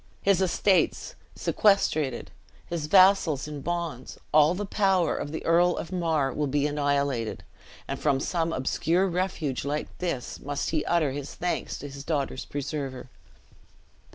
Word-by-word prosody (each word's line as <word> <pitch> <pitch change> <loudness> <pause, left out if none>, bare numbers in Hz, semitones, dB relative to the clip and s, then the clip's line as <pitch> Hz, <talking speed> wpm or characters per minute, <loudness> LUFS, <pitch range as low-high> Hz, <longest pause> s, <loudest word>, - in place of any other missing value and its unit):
His 195 -2 +3
estates 190 - +1 0.2
sequestrated, 155 - +1 0.3
his 165 -3 -4
vassals 185 -6 +5
in 150 -2 -6
bonds, 170 -6 -4 0.2
all 155 +3 +5
power 195 -3 +2
of 145 - -4
the 160 - -5
Earl 175 +1 +3
of 170 - -5
Mar 160 -7 0
will 150 -1 -1
be 145 +1 +1
annihilated; 140 -5 -1 0.4
and - - -4
from 140 -3 +2
some 165 +2 -1
obscure 165 +7 +1
refuge 175 -7 -2
like 145 +2 -3
this, 170 -9 -3
must 145 0 -3
he 155 -2 0
utter 165 -5 +2
his 145 +1 -6
thanks 175 0 -2
to 145 - -7
his 140 0 -9
daughter's 140 -4 -2
preserver." 135 -3 -5
155 Hz, 140 wpm, -27 LUFS, 140-175 Hz, 0.4 s, vassals